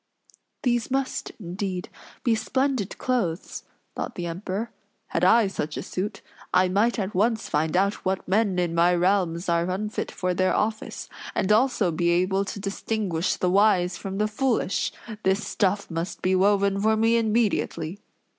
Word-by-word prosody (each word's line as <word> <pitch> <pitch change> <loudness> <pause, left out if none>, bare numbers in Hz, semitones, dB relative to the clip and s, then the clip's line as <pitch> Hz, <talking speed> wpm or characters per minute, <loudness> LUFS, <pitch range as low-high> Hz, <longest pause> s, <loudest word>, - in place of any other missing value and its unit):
"These 240 -3 +1
must, 270 0 -2
indeed, 185 0 -4 0.4
be 235 - +3
splendid 260 -1 -1
clothes!" 195 -10 -2 0.3
thought - - -4
the 175 - -4
Emperor. 190 +6 -4 0.4
"Had - - -1
I 230 -1 +6
such 155 -6 -3
a - - -3
suit, 195 +3 -4 0.3
I 185 0 +4
might 210 +6 +2
at 200 -1 -2
once 220 +4 +1
find 155 +3 0
out 200 +2 +1
what 190 0 -1
men 200 -1 +2
in 175 -2 0
my 170 +1 +4
realms 180 -1 +1
are 170 +1 +1
unfit 210 +4 -2
for 180 -1 -2
their 185 +1 +2
office, 220 +1 -2 0.3
and 190 - +1
also 220 -4 +3
be 170 +2 +1
able 185 +3 +2
to 200 - -5
distinguish 195 -3 -1
the 180 - 0
wise 190 -3 +3
from 195 0 -5
the 210 +1 +2
foolish! 225 -2 0 0.3
This 195 +2 +1
stuff 200 -1 0
must 165 +2 -4
be 185 - +2
woven 200 +1 +3
for 220 +1 +3
me 225 +1 +3
immediately." 210 -6 0
195 Hz, 160 wpm, -25 LUFS, 180-220 Hz, 0.4 s, I